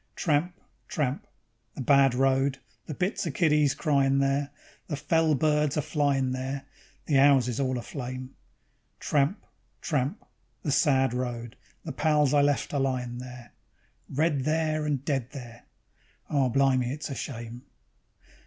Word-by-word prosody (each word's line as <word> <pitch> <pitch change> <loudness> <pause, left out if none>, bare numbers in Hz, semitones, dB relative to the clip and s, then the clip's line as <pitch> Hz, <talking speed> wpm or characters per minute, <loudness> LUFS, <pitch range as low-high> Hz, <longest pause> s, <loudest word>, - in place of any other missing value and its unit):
Tramp, 165 +3 0 0.3
tramp, 140 -4 -2 0.5
the - - -5
bad 135 0 +4
road, 135 +1 +2 0.3
the 150 - -5
bits 180 +1 -1
o' - - -1
kiddies 150 -2 +2
cryin' 140 -3 +2
there, 140 +1 +1 0.4
The 150 - -2
fell 155 +2 +2
birds 150 +1 +1
a - - +2
flyin' 140 -4 +1
there, 130 +1 -4 0.4
the 140 -4 +3
'ouses 135 -4 +4
all 130 -2 0
aflame; 130 +1 -6 0.7
Tramp, 150 +7 0 0.3
tramp, 145 - -2 0.4
the 150 - -1
sad 135 -3 +3
road, 120 -2 -4 0.3
the 160 - -5
pals 150 -1 +2
I 145 - +5
left 145 +1 +1
a 140 - +1
lyin' 125 -2 -2
there, 125 -1 -10 0.6
Red 150 +1 +1
there, 155 0 0
and 140 -2 -1
dead 135 -4 -2
there.... 120 -4 -10 0.7
Oh 135 -3 +2
blimy, 130 -1 +2
it's 145 +2 -5
a - - -2
shame! 120 -3 -6
140 Hz, 140 wpm, -27 LUFS, 130-150 Hz, 0.7 s, I